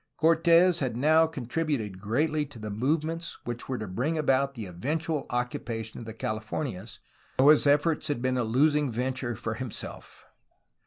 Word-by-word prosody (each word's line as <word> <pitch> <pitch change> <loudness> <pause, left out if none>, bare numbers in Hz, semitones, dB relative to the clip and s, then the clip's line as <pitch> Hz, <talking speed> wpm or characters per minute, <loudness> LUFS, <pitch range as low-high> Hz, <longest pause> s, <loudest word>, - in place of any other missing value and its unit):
Cortes 165 +2 +5
had 125 -5 -2
now 160 +4 +5
contributed 130 - -3
greatly 150 +8 +1
to 140 - -13
the 110 -1 -6
movements 155 +9 -1
which 120 +1 -6
were 130 - -1
to 110 - -4
bring 130 - -1
about 140 -2 +1
the 110 -4 -5
eventual 150 - -2
occupation 115 -2 -3
of 115 - -8
the 110 - -6
Californias, 110 -1 -4 0.4
though 135 +3 +6
his 150 -1 +6
efforts 150 +2 +2
had 145 -5 -1
been 130 +1 0
a - - +1
losing 145 +4 +2
venture 125 0 -2
for 110 +1 -3
himself. 125 -1 -8
130 Hz, 160 wpm, -28 LUFS, 115-155 Hz, 0.4 s, though